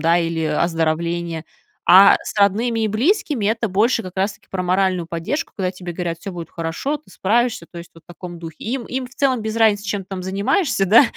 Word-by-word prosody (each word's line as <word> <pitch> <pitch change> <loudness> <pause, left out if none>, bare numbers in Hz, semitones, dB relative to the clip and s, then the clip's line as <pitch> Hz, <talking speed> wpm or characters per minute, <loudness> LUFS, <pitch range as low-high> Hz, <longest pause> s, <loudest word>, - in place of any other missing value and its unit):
да, 165 +1 +3
или 165 -1 -1
оздоровления. 165 +1 -1 0.4
А 190 +2 +8
с - - -6
родными 225 +4 +2
и - - +2
близкими- 255 - +1
это 230 +2 +1
больше 225 +5 +2
как 185 - -7
раз 195 +2 0
таки - - -24
про 185 -1 -3
моральную 185 -1 +1
поддержку, 170 - -3
когда 185 -2 -1
тебе 180 -1 -7
говорят: 170 -1 -3
"Всё 195 - -6
будет 170 -2 -7
хорошо, 170 - -3
ты 305 - -21
справишься", 225 -2 0
то 175 - -10
есть 170 - -10
вот 165 - -18
в - - -79
таком 175 0 -9
духе. 165 -1 -8
Им 240 +1 -2
им 255 0 -4
в 260 - -20
целом 260 -5 +1
без 220 +1 -3
разницы, 215 -3 +3
чем 200 0 -2
ты 185 - -20
там 185 -1 -4
занимаешься, 200 - +1
да, 220 +7 +8
190 Hz, 220 wpm, -20 LUFS, 170-225 Hz, 0.4 s, А